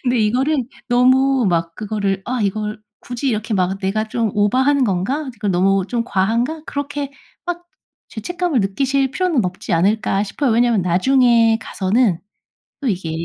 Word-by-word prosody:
근데 245 -1 +1
이거를 255 +8 +1 0.3
너무 260 +1 +3
막 165 -1 -1
그거를 200 -2 -2
'아 255 0 -2
이걸 210 +1 -2 0.2
굳이 245 +3 -3
이렇게 220 -1 -2
막 190 -1 0
내가 210 +3 -1
좀 225 -1 -1
오바하는 260 +7 +2
건가? 220 +9 -1
이제 240 -4 -10
그 210 - -2
너무 195 +1 +2
좀 235 -1 -1
과한가?' 235 +10 0
그렇게 285 0 -4 0.3
막 350 0 -4 0.4
죄책감을 335 +3 -2
느끼실 270 +7 0
필요는 325 - 0
없지 180 +1 -4
않을까 195 +3 +2
싶어요. 235 +6 -1
왜냐하면 235 -3 +3
나중에 230 +5 +3
가서는 195 -2 0 0.6
또 270 - -2
이게 180 -6 -2
225 Hz, 330 characters per minute, -19 LUFS, 195-265 Hz, 0.6 s, 너무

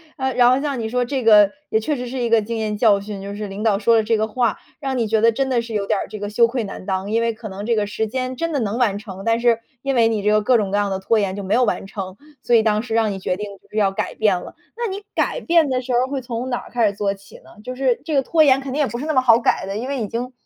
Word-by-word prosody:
呃， 265 0 -1
然 245 -1 +6
后 255 +2 +3
像 280 -3 -2
你 225 - -2
说 245 +2 0
这 255 0 -3
个 210 -3 +7 0.2
也 220 - +2
确 300 - -1
实 250 0 -5
是 255 +2 -5
一 240 -1 0
个 230 -1 +4
经 230 +2 -4
验 215 -1 -2
教 205 -3 +4
训， 200 -1 -7
就 200 +1 -6
是 210 0 -5
领 195 +2 -6
导 215 -3 +3
说 230 +3 +3
了 - - +4
这 225 +1 +1
个 215 0 +1
话， 235 +2 0 0.2
让 270 -3 -2
你 235 - +1
觉 220 +1 +2
得 230 +2 +5
真 270 +3 -1
的 245 -2 +1
是 230 -1 -8
有 205 -2 -1
点 200 - 0
儿 - - -4
这 215 - -8
个 205 0 -4
羞 230 +2 +4
愧 240 0 -2
难 195 -2 -8
当， 190 +1 -2
因 225 +1 +2
为 230 0 0
可 220 0 -9
能 195 +2 -7
这 235 0 +1
个 210 -1 +1
时 210 +2 -2
间 255 +2 -3
真 330 +2 -2
的 285 - +1
能 215 0 -2
完 225 -6 +1
成， 195 -2 -9
但 230 0 +1
是 235 -2 +3 0.2
因 275 +1 -1
为 235 -3 +4
你 220 -3 -1
这 210 - +3
个 215 0 +3
各 245 +4 +3
种 200 -3 -1
各 205 - +1
样 205 -1 +1
的 190 -1 -2
拖 220 +3 +1
延 195 -2 -1
就 200 - -5
没 195 +2 -1
有 250 +2 +4
完 210 - -2
成， 190 -1 -6 0.3
所 240 - +2
以 225 - +5
当 215 -1 +2
时 230 -1 -6
让 220 -2 +2
你 195 - -5
决 185 - -1
定 210 +2 -5
就 - - -28
是 - - -14
要 200 -2 +3
改 195 - -4
变 205 -4 +2
了。 - - -11 0.2
那 475 0 -1
你 390 +1 -5
改 - - -1
变 335 -4 +3
的 255 -1 0
时 255 - -6
候 240 - +4
儿 - - -8
会 270 0 -3
从 245 0 -4
哪 245 - -1
儿 - - -13
开 235 -3 +2
始 200 - -1
做 200 -1 -1
起 195 0 -16
呢？ 210 - -17
就 255 0 -5
是 255 -2 +1
这 315 - -2
个 270 - +3
拖 320 +4 +2
延 270 -1 +4
肯 270 -1 -6
定 280 - -2
也 285 - +2
不 235 - -5
是 270 - -5
那 315 - 0
么 260 - +4
好 235 -3 +6
改 230 - +1
的， 195 +1 -5
因 245 +4 -4
为 275 -3 -2
已 215 - -2
经 240 +4 -4
230 Hz, 370 characters per minute, -21 LUFS, 205-255 Hz, 0.3 s, 个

